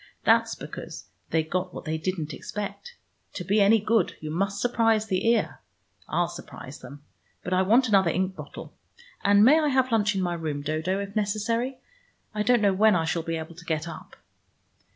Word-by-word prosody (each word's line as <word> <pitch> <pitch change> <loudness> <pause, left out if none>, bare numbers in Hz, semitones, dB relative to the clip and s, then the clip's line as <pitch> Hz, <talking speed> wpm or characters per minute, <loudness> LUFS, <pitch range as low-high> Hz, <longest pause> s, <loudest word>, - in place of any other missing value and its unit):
That's - - +3
because - - -8 0.2
they 160 0 +1
got 180 +3 -3
what - - -7
they 160 0 -2
didn't 160 -2 -3
expect. 210 - -6 0.4
To 180 - -5
be 205 +4 +2
any 205 +3 +6
good, 215 -2 +1
you 155 0 -6
must 195 +4 -1
surprise 225 -2 +2
the 190 0 -1
ear. 230 -2 +1 0.5
I'll - - +1
surprise - - -10
them. 145 0 -12 0.4
But 180 - -3
I 185 - +3
want 235 +7 +4
another 195 -5 +4
ink 185 +3 -1
bottle. - - -9 0.5
And 200 +1 +6
may 300 +6 +7
I 305 - +1
have 260 -2 +2
lunch 210 -2 +2
in 190 - 0
my 175 -1 -1
room, 155 -4 -4
Dodo, 160 +6 -1
if 200 0 -6
necessary? 225 +5 -1 0.6
I 210 - -1
don't 240 0 +3
know 200 -1 +4
when 215 +2 +4
I 165 -2 +1
shall 165 +1 -1
be 165 0 -3
able 160 +1 -7
to 170 +1 -13
get 160 0 -2
up." - - -10
195 Hz, 195 wpm, -26 LUFS, 170-220 Hz, 0.6 s, may